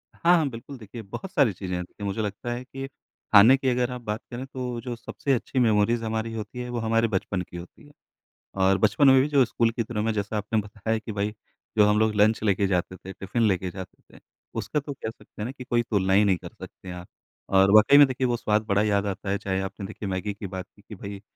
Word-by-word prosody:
हाँ, 175 +1 +4
हाँ, 150 -4 +1
बिल्कुल, 125 +4 -9
देखिए 115 0 -9
बहुत 145 - -8
सारी 140 - +3
चीज़ें 90 0 -5
हैं। 90 - -2
देखिए 100 +3 -9
मुझे 100 +3 -2
लगता 105 +3 -4
है 120 +1 -4
कि 135 +1 -7 0.5
खाने 110 +6 +8
की 135 0 0
अगर 125 0 0
आप 125 0 -6
बात 105 -1 -4
करें 125 +2 -5
तो 125 -2 -5
जो 120 0 -5
सबसे 125 +4 -2
अच्छी 130 +1 -1
मेमोरीज़ 115 0 +3
हमारी 110 0 -2
होती 110 +2 -6
है 125 - -5
वो 120 -1 -3
हमारे 115 0 +2
बचपन 95 -2 -2
की 90 0 -9
होती 85 - -12
है। - - -18 0.7
और 95 0 +4
बचपन 110 +7 +3
में 130 -1 +7
भी 140 - +1
जो 140 -3 +5
स्कूल 115 0 +1
के 115 - -2
दिनों 110 -1 -3
में 115 - +1
जैसा 105 +1 -2
आपने 105 +1 0
बताया 105 +2 -3
कि 110 +1 -7
भई 105 0 -2 0.4
जो 105 - +7
हम 105 +1 +3
लोग 110 -1 +2
लंच 110 +1 +3
लेके 100 -1 +2
जाते 95 -1 -1
थे, 95 +1 -10
टिफिन 100 +5 -3
लेके 95 -2 0
जाते 95 0 -11
थे - - -16 0.4
उसका 150 - -1
तो 145 0 -6
कह 110 - -5
सकते 115 - -13
हैं - - -2
ना 125 - -4
कि 135 -1 -10
कोई 120 -1 +1
तुलना 95 -4 0
ही 100 +2 +6
नहीं 95 -3 +3
कर - - -10
सकते 95 - -12
हैं 90 - -5
आप। 90 0 -9 0.4
और 95 0 +5
वाकई 110 +7 +7
में 145 - +10
देखिए 130 0 -1
वो 120 -1 0
स्वाद 105 -1 +1
बड़ा 100 0 +2
याद 100 -1 +1
आता 100 0 -4
है। 100 - +1
चाहे 95 -1 -2
आपने 95 +1 -6
देखिए 105 -2 -6
मैगी 95 +2 -2
की 100 0 -7
बात 95 -1 -6
की 100 - -20
कि 105 +1 -11
भई 100 +1 -8
110 Hz, 260 wpm, -25 LUFS, 100-120 Hz, 0.7 s, में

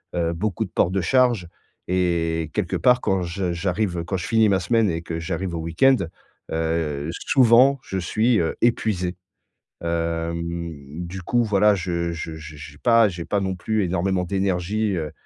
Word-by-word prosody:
heu, 85 -1 0
beaucoup 95 +2 -2
de - - -12
port 85 - +1
de 95 - 0
charge 120 -1 +2 0.4
et 85 -3 0
quelque - - -1
part, 125 0 +4
quand 95 -5 0
je 90 0 -2
j'arrive, 90 0 -1
quand 95 +2 -2
je 90 - -5
finis 110 -2 +4
ma 95 - +3
semaine 110 +3 +2
et 85 -1 -2
que 85 -1 -5
j'arrive 85 +1 -3
au - - -3
week-end, 85 +12 +3 0.6
heu, 80 -3 -1
souvent, 130 +4 +4
je 95 - -5
suis, 110 +6 +1
heu, 80 -1 -1
épuisé, 100 -6 +1 0.7
hem, 85 -2 -3
du 95 +1 -7
coup, 120 +4 +2
voilà, 105 -1 +4
je 85 -2 -2
je 80 -1 -5
je 80 0 -10
j'ai 75 -1 -11
pas 115 +2 +4
j'ai 85 -2 -6
pas 100 - 0
non 95 -1 -2
plus 110 +4 -1
énormément 90 +1 0
d'énergie, 95 +2 0
heu 80 -3 -3
90 Hz, 175 wpm, -23 LUFS, 85-105 Hz, 0.7 s, part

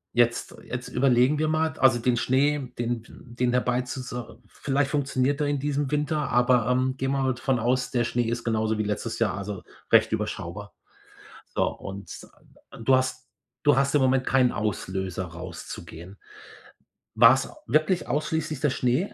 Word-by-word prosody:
jetzt 120 0 +1
jetzt 125 0 -6
überlegen 130 +2 +3
wir 155 - +1
mal, 160 +1 +1
d 160 - -13
also 130 -3 +5
den 120 +1 +1
Schnee, 130 +2 +1
den 120 -1 -2
den 125 0 -3
dabei 125 0 +1
zu 125 +1 -6
zu 125 -2 -7
vielleicht 140 0 -1
funktioniert 140 0 0
er 145 - +1
in 145 -1 0
diesem 145 0 -1
Winter, 150 0 -1
aber, 125 -1 +3
ähm, 130 +1 +1
gehen 135 0 -1
wir 135 -1 0
mal 130 -1 +1
von 125 +2 0
aus, 125 +3 0
der 120 -2 +1
Schnee 120 +1 0
ist 120 +1 -2
genauso 110 -1 0
wie 110 - 0
letztes 105 +2 -3
Jahr, 110 -5 +1
also 100 -1 -6 0.3
recht - - +5
überschaubar. - - -4 0.7
So - - 0
und 95 +1 -7 0.7
du 130 +3 +5
hast 130 0 -1 0.4
du 145 -3 +4
hast 140 0 +2
im 150 - +4
Moment 130 0 +2
keinen 130 -2 +3
Auslöser 95 -3 -3
rauszugehen. 85 +1 -9 1.0
War's 120 +4 +5 0.2
wirklich 155 +4 +1
ausschließlich 150 +1 -2
der 150 -3 +2
Schnee, 125 +11 0
125 Hz, 165 wpm, -26 LUFS, 115-140 Hz, 1.0 s, also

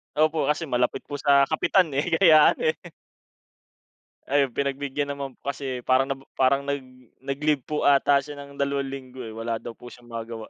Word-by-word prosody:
Opo, 155 +1 +2
kasi 150 +3 0
malapit 125 -5 -1
po 145 -1 -7
sa 140 0 +5
kapitan, 165 +1 +2
eh, 140 +2 -1
kaya 160 -4 +6
ano, - - -7
eh. - - -22 1.5
Ayun, 140 -1 +2
pinagbigyan 140 +2 -2
naman 140 -2 -7
po 140 - -4
kasi 130 -3 -6
parang 130 +1 +3
nabo 135 0 -5
parang 135 +1 +2
nag 140 0 -2 0.4
nag-leave 140 +2 -1
po 150 +3 -2
ata 140 0 +5
siya 145 +2 -8
ng 140 0 -11
2 140 -1 -1
linggo, 130 -1 -8
eh, 115 - -7
wala 115 0 -3
daw 115 0 -8
po 125 - -12
siyang 120 0 -17
magawa. 115 -1 -7
140 Hz, 185 wpm, -25 LUFS, 130-145 Hz, 1.5 s, kaya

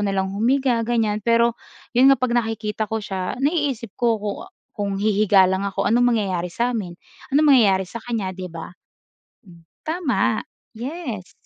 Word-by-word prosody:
na 200 - 0
lang 190 0 -1
humiga, 245 +2 +2
ganyan. 225 -2 0
Pero 235 +1 +3 0.4
'yon 255 +3 +6
nga 275 - +6
pag 255 -1 0
nakikita 220 -2 -2
ko 220 +1 -1
siya, 190 -3 -4
naiisip 280 - -1
ko 235 -2 +1
ku 210 0 -3 0.4
kung 200 -2 -2
hihiga 205 -2 +4
lang 190 +1 0
ako, 195 - -2
anong 245 +1 +3
mangyayari 185 -4 -1
sa'min? 225 -4 -2 0.4
Anong 305 +1 +5
mangyayari 195 -6 +4
sa 230 +6 -8
kanya? 220 -6 -3
'Di 185 0 -6
ba? 165 0 -8 0.7
Hmm, 170 -2 -16 0.2
tama, 320 -3 0 0.3
yes. 245 - -6
220 Hz, 155 wpm, -22 LUFS, 195-245 Hz, 0.7 s, yon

